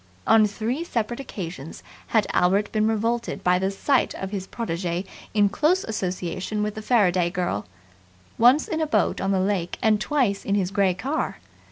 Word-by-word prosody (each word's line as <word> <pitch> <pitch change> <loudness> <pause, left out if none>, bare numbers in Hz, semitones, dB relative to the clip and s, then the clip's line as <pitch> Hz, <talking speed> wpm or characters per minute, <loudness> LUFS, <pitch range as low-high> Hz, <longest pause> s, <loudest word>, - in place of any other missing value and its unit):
On 220 -1 +5
three 230 +9 -3
separate 240 -6 -2
occasions 170 - -7 0.2
had 220 -3 +2
Albert 195 +4 +2
been 215 0 +1
revolted 230 +2 -1
by 180 0 +3
the 190 +1 0
sight 255 +7 +1
of 190 0 -5
his 195 -2 -4
protege 175 -4 -3 0.3
in 205 -1 +5
close 315 - +2
association 185 0 -3
with 210 0 -2
the 215 - -7
Faraday 185 -7 +3
girl 175 - -2 0.7
once 250 +6 +5
in 320 -1 -2
a 315 - 0
boat 295 - +1
on 195 - -1
the 195 -1 +2
lake 185 -2 -1
and 215 -1 +2
twice 245 -10 0
in 200 - 0
his 190 -2 0
grey 195 -3 +2
car. 275 - -2
205 Hz, 175 wpm, -24 LUFS, 185-230 Hz, 0.7 s, On